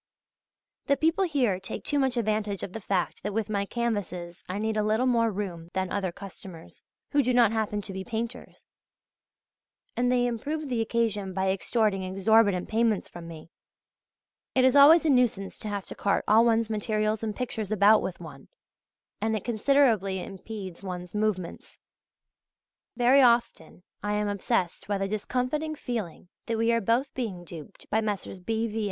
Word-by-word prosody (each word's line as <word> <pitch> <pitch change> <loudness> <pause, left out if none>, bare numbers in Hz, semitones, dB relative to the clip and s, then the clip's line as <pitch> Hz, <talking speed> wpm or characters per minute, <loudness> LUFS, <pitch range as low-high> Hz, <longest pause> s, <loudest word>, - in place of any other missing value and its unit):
The 280 - +3
people 325 +5 +2
here 250 - +1
take 190 - -7
too 290 - +1
much 265 -2 +1
advantage 215 -3 -1
of 185 - -6
the 225 - -6
fact 190 -2 -1
that 205 +1 -4
with 225 -1 -1
my 200 -1 -1
canvases 190 -8 -3
I 185 - -2
need 220 +1 -1
a 215 - +2
little 215 +4 +1
more 230 -2 +3
room 185 -5 -5
than 190 -1 -2
other 195 -3 -1
customers, 185 -3 -11 0.3
who 285 - +4
do 250 -1 +1
not 235 -4 +5
happen 210 -2 -1
to 195 - -6
be 190 0 -5
painters, 235 +2 -6 1.3
and 245 +1 +1
they 245 -1 +3
improve 285 +6 -3
the 240 -3 0
occasion 220 -4 -1
by 190 0 +1
extorting 200 0 0
exorbitant 195 0 +2
payments 225 -2 +1
from 170 -1 -10
me.... 165 -1 -11 1.0
It 260 -1 +5
is 260 - +4
always 315 +4 +8
a - - +3
nuisance 240 -7 +1
to - - -6
have 205 -2 -3
to - - -8
cart 200 - 0
all 220 +2 +6
one's 230 -1 +2
materials 215 0 -1
and 215 -2 -3
pictures 245 -5 -4
about 210 +1 +5
with 185 - -5
one, 150 -5 -11 0.7
and 220 +1 +1
it 210 - -4
considerably 230 -5 +2
impedes 195 -2 -8
one's 180 -2 -6
movements. 210 -5 -3 1.2
Very 255 +3 +5
often 235 -9 +1 0.2
I 205 0 -2
am 210 0 0
obsessed 190 -3 -1
by 200 -1 0
the 195 0 -1
discomfiting 255 +9 -2
feeling 215 - -5 0.2
that 230 -1 -1
we 230 +1 +2
are 230 0 +2
both 235 +6 +1
being 210 -9 -4
duped 170 +2 -11
by 220 - +2
Messrs. 205 -3 -4
B. 220 +5 -1
V. 225 0 -3
215 Hz, 170 wpm, -27 LUFS, 195-235 Hz, 1.3 s, always